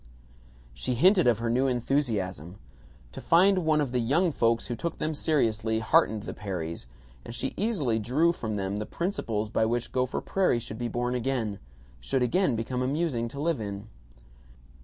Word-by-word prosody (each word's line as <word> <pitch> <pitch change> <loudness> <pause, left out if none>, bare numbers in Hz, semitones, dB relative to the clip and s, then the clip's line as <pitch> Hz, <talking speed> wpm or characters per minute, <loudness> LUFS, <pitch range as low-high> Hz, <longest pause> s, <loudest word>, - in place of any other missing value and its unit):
She - - -2
hinted 180 - +5
of 120 -3 +4
her 115 +1 -2
new 130 +3 +2
enthusiasm. 110 - -1 0.5
To - - -8
find 185 +3 +4
one 155 -1 +3
of 140 -4 -1
the 125 - +1
"young 155 +10 +2
folks" 115 -4 +1
who 120 - -3
took 170 +6 -4
them 155 - -2
seriously, 115 -8 +1
heartened 110 -2 +2
the - - -5
Perrys, 85 - -5 0.4
and 115 - -8
she - - -2
easily 170 - 0
drew 140 +10 +2
from 110 -10 -4
them 100 0 -2
the 105 - -4
principles 110 - -2
by 110 - +2
which 120 +1 -2
Gopher 125 0 0
Prairie 190 -10 +1
should 110 -1 -6
be 120 - -1
born 125 +1 -2
again 120 -5 -1 0.4
should 125 - 0
again 150 +3 +2
become 125 +3 -2
amusing 135 -3 0
to 140 +4 -8
live 160 -4 0
in. 100 +1 -6
120 Hz, 175 wpm, -27 LUFS, 110-150 Hz, 0.5 s, hinted